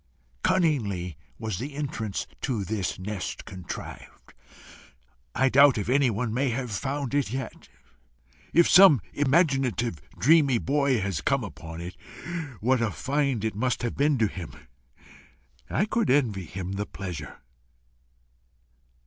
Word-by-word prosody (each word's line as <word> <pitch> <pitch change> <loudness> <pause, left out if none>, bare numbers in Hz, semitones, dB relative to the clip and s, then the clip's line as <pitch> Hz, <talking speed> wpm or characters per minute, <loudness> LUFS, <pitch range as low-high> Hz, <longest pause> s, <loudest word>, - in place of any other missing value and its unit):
Cunningly 105 - +1 0.2
was 110 -5 -4
the 140 +4 -5
entrance 115 -8 -3 0.2
to 120 -7 -1
this 100 -3 -2
nest 95 0 -5
contrived: 90 -3 -9 1.0
I 135 - +3
doubt 140 0 +6
if 105 +1 -2
anyone 125 -4 +2
may 135 +3 +1
have 125 0 -3
found 135 +5 -3
it 140 -7 +1
yet. 130 +1 -6 0.8
If 170 0 +5
some 180 - +8
imaginative, 135 - +1 0.2
dreamy 140 - +5
boy 140 0 +1
has 95 -5 -2
come - - +1
upon 80 +2 -8
it, 90 +1 -7 0.7
what 125 +2 +2
a 115 - +1
find 135 -1 -1
it 110 - -1
must 125 +4 -1
have 120 - -2
been 145 0 +2
to 115 - +3
him! 90 -4 -7 1.2
I 195 - +1
could 225 0 0
envy 115 -9 +2
him 95 +2 -6
the 100 +2 -3
pleasure. 90 -7 -7
120 Hz, 130 wpm, -26 LUFS, 100-140 Hz, 1.2 s, some